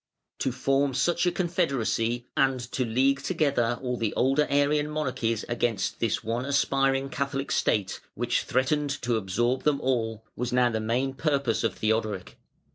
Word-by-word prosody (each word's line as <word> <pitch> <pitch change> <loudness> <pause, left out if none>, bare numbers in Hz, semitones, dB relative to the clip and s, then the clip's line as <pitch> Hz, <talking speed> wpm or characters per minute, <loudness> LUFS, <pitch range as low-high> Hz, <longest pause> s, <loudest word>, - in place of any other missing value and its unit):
To 130 - 0
form 135 +2 +1
such 175 +4 +2
a - - +3
confederacy 135 - 0
and 135 -1 +2
to 130 - 0
league 135 +4 +2
together 140 -7 +1
all 125 -1 -1
the 115 -3 -2
older 135 +4 +2
Arian 145 +1 +2
monarchies 125 -7 -1
against 120 -4 -1
this 115 -2 0
one 115 +2 -2
aspiring 135 -1 +1
Catholic 140 0 -3
state, 100 -3 0 0.2
which - - 0
threatened 145 +3 0
to 120 -1 +1
absorb 120 +6 0
them 150 -2 +1
all, 115 -4 -1
was 125 0 -3
now 125 -1 +3
the 110 - -1
main 120 +5 0
purpose 140 -6 0
of - - 0
Theodoric. 110 -3 -1
130 Hz, 155 wpm, -27 LUFS, 115-140 Hz, 0.2 s, a